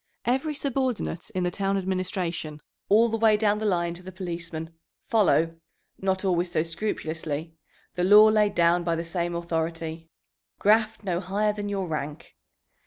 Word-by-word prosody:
Every 270 +5 0
subordinate 260 - -2
in 185 - 0
the 180 - 0
town 195 +1 0
administration, 185 -5 -3 0.3
all 220 +3 +6
the 225 0 -2
way 220 -1 +5
down 210 -1 +2
the 215 - -1
line 175 -3 0
to 175 - -10
the 185 +1 -9
policemen, 170 -3 -6 0.3
follow 165 -7 +2 0.4
not 190 0 -1
always 175 -1 +1
so 155 - +1
scrupulously 160 -3 -3 0.4
the 180 - -1
law 205 +3 +8
laid 215 -1 +3
down 170 +1 +3
by 170 -1 0
the 165 - -3
same 170 0 -2
authority, 165 -1 -3 0.5
"Graft 215 +1 +2
no 180 -3 -1
higher 205 +3 0
than 205 -1 -4
your 195 -2 -2
rank." 150 -2 -5
185 Hz, 160 wpm, -26 LUFS, 165-210 Hz, 0.5 s, law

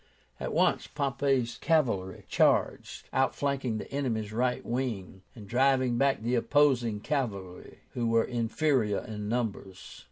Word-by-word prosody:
At - - -3
once - - +2
Pompey's 135 -4 -1
cavalry 115 - 0
charged, - - +1
outflanking 135 -3 0
the - - -7
enemy's 115 -7 -2
right 125 +2 0
wing, 115 -7 -3
and 105 -4 -11
driving 130 0 +2
back 135 -5 +2
the 120 +2 0
opposing 125 -4 +2
cavalry, 100 -10 -4
who 120 -2 -2
were 115 0 +3
inferior 120 -2 0
in 105 -1 -5
numbers. 105 -5 -4
120 Hz, 125 wpm, -29 LUFS, 110-135 Hz, -, were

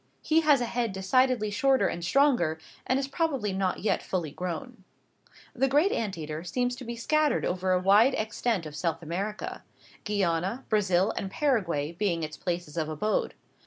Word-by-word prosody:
He 320 +1 +3
has 295 -5 +4
a - - +1
head 235 -3 -2
decidedly 215 +3 +2
shorter 265 +5 +3
and 170 - -4
stronger, 190 - +3 0.3
and 255 - +2
is 270 0 -1
probably 275 - -1
not 190 -1 -1
yet 215 - +1
fully 175 -6 -3
grown. 180 - -6 0.7
The 270 0 +1
great 295 +9 +3
ant 205 -6 -2
eater 155 0 -5
seems 245 +8 -1
to 260 - -8
be 235 0 -5
scattered 305 +5 +1
over 185 +1 -1
a 185 - +3
wide 205 +8 +5
extent 220 -3 -1
of 150 -1 -8
South 165 +1 -2
America 195 +6 -4 0.4
Guiana, 195 +3 -1
Brazil, 195 -2 +2
and 195 - -3
Paraguay, 190 - 0
being 170 -2 -1
its 155 0 -5
places 175 -2 -4
of 155 -1 -1
abode. 185 +8 -1
205 Hz, 170 wpm, -28 LUFS, 175-250 Hz, 0.7 s, wide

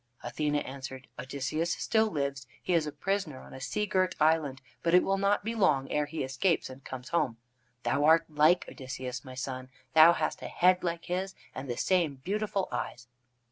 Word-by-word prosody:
Athene 150 -1 -1
answered: 130 -2 -5
"Odysseus 140 +6 -2
still 220 0 +2
lives. 140 -6 -3 0.2
He 180 - 0
is 160 -3 +2
a - - -3
prisoner 195 -6 -2
on - - -13
a 130 - -9
sea 210 +10 -1
girt 185 -2 +1
island, 155 -4 +2 0.2
but 170 +1 +3
it 180 - +6
will 195 0 +1
not 200 +1 +2
be 225 +2 -2
long 145 -11 +2
ere 150 0 +1
he 155 0 -3
escapes 135 +4 0
and 130 +1 -12
comes 130 +2 -7
home. 150 -9 0 0.5
Thou 145 - +1
art 165 +1 +6
like 155 +4 +4
Odysseus, 130 -2 -6
my 130 -1 -10
son. 130 0 -5 0.2
Thou 160 +2 +9
hast - - -2
a - - -5
head 180 +1 +3
like 170 -1 -2
his, 190 +2 -2 0.2
and 135 0 -6
the 120 - -2
same 175 -6 +2
beautiful 195 +6 -2
eyes." 125 0 -4
155 Hz, 190 wpm, -30 LUFS, 130-180 Hz, 0.5 s, Thou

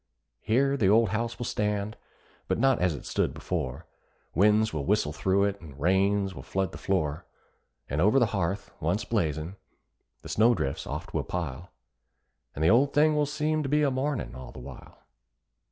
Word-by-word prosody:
Here 135 +5 +2
the 100 -7 +3
old 115 +2 +5
house 115 +3 -2
will 120 - -4
stand, 105 0 -1 0.5
but - - 0
not 135 +1 +3
as 90 -3 +1
it 70 - -9
stood - - -1
before: 65 -1 -4 0.5
Winds 105 +4 +3
will 75 -3 -2
whistle 100 -4 +1
through 95 +4 +1
it, 100 -1 -1
and 75 -4 -12
rains 95 +4 +2
will - - -8
flood 95 -2 -2
the - - -9
floor; 80 -6 -1 0.6
And 75 +3 -1
over 105 +7 +4
the 125 - +5
hearth, 95 +1 -2
once - - -1
blazing, 80 +4 -1 0.7
the - - -9
snow 115 +3 +4
drifts 70 -6 -3
oft - - -6
will - - +1
pile, 85 -1 -5 0.9
And 75 - -2
the 80 - +5
old 135 +5 +3
thing 155 +1 +4
will 150 -1 +2
seem 155 +1 0
to 135 - -3
be 150 +1 +3
a 140 - +2
mournin' 130 - -2
all 65 0 -9
the - - -13
while. 65 +1 -11
100 Hz, 185 wpm, -28 LUFS, 80-120 Hz, 0.9 s, old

